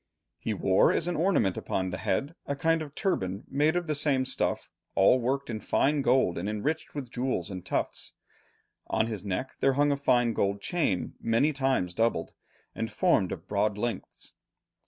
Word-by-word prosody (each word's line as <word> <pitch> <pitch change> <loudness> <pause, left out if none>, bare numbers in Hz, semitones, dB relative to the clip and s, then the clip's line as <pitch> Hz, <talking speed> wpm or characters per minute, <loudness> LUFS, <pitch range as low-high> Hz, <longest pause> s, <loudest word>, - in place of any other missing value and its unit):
He - - -2
wore - - +4
as 165 - 0
an 175 - -1
ornament 160 - +2
upon 95 -1 -2
the 90 - -4
head, 140 - -1
a 140 - -1
kind 165 +3 +1
of 150 -2 -8
turban 100 - -1
made 150 +4 +2
of 175 0 0
the 155 - -1
same 140 -3 +1
stuff, - - -1 0.2
all 100 +7 +5
worked 135 +3 -1
in 110 -2 -4
fine 145 +6 +1
gold 125 -10 +2
and 95 +4 -3
enriched 150 +12 -2
with 130 -5 -5
jewels 125 -7 -2
and 90 -2 -6
tufts. - - -3 0.7
On 110 - +1
his 110 -4 -5
neck 100 +6 -4
there 135 - +3
hung 145 +2 +3
a - - +2
fine 120 -4 +2
gold 100 -1 0
chain 110 - -1
many 115 +7 +2
times 130 -11 0
doubled, 115 -5 0 0.4
and 115 0 -3
formed 100 -3 +2
of 80 - -7
broad 105 0 0
links. 120 +2 -5
125 Hz, 180 wpm, -28 LUFS, 100-145 Hz, 0.7 s, all